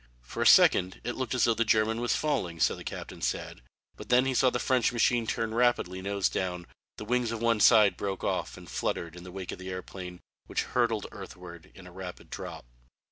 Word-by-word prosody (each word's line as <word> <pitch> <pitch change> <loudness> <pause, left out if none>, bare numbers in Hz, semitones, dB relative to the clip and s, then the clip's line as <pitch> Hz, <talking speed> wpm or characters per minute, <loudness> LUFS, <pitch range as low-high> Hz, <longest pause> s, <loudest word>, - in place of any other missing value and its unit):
For - - -6
a - - +4
second 90 +1 +5
it 120 - -3
looked 130 -1 -2
as 125 - +2
though 115 - +4
the 115 - +1
German 110 +1 +2
was 120 - +1
falling, 115 - -1
so - - +3
the - - -10
captain - - -7
said, - - -3 0.3
but - - -11
then 125 +1 +5
he 135 - 0
saw 130 +1 +4
the 125 - -2
French 125 -1 +2
machine 120 -1 +2
turn 115 0 -2
rapidly 115 -6 +1
nose 100 0 0
down, 90 -2 -3 0.3
the 105 - -7
wings 120 0 0
of 115 - -4
one 115 -1 +2
side 105 -2 +6
broke 95 -1 -4
off - - -2
and - - -12
fluttered 85 0 -3
in 90 - -10
the 90 - -10
wake 95 -1 -6
of - - -8
the 95 0 -7
airplane, 90 -1 -7 0.3
which - - -1
hurtled 115 -4 0
earthward 90 -3 -11
in 95 - -13
a 90 - -12
rapid 90 0 -9
drop. - - -7
105 Hz, 220 wpm, -29 LUFS, 90-120 Hz, 0.3 s, side